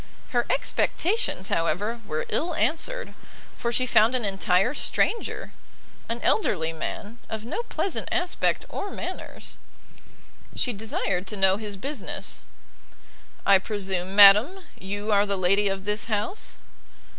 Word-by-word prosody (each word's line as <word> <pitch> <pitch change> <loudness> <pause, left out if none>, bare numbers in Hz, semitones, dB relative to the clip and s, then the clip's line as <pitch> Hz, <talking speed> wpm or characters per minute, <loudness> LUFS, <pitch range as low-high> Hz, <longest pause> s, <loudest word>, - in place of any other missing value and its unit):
Her 240 -3 0
expectations, 360 - 0
however, 205 +8 -1
were 155 0 -3
ill 335 +1 -1
answered, 330 - -1 0.4
for 235 - -2
she 255 +2 +1
found 235 0 +4
an 245 -4 -1
entire 195 +2 +2
stranger; 455 +8 -1 0.6
an 230 +1 -2
elderly 165 - +1
man, 210 +7 -6
of 220 0 -5
no 255 - -3
pleasant 395 -5 -2
aspect 355 0 0
or 400 - -5
manners. - - -7 1.0
She 250 -2 -1
desired 200 -3 -2
to 210 - -5
know 190 0 +3
his 210 -2 -6
business. 275 +2 -5 1.0
"I 200 -1 +6
presume, 190 -2 -2
madam, 210 - +8 0.2
you 205 +3 -4
are 205 0 +4
the 200 -1 -1
lady 195 +3 +3
of 195 0 -2
this 210 0 0
house?" 220 - +2
210 Hz, 130 wpm, -25 LUFS, 195-255 Hz, 1.0 s, madam